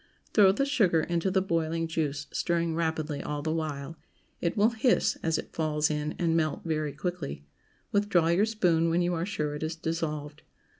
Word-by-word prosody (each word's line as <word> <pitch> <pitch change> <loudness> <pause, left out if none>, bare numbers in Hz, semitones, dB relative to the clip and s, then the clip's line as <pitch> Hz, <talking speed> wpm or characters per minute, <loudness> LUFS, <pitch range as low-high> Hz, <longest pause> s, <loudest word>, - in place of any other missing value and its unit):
Throw 200 -3 +7
the 275 +8 0
sugar 205 - +3
into 170 +3 0
the 190 0 +2
boiling 165 -2 0
juice, 150 -3 -2
stirring 170 -1 0
rapidly 160 -2 -1
all 145 -1 -4
the 155 0 0
while. 155 -1 -4 0.4
It 170 - -1
will 210 +3 +4
"hiss" 235 +2 +2
as 160 -1 +1
it - - -7
falls 155 -1 +1
in, 150 0 -2
and 165 -2 +1
melt 155 -2 0
very 155 -3 -1
quickly. 150 - -4 0.5
Withdraw 200 -5 +3
your 190 +6 +3
spoon 175 -7 +2
when 170 +2 +2
you 175 0 0
are 170 +2 -2
sure 150 -7 -2
it 150 - -6
is 160 +1 -2
dissolved. 155 -3 -3
165 Hz, 185 wpm, -28 LUFS, 155-175 Hz, 0.5 s, Throw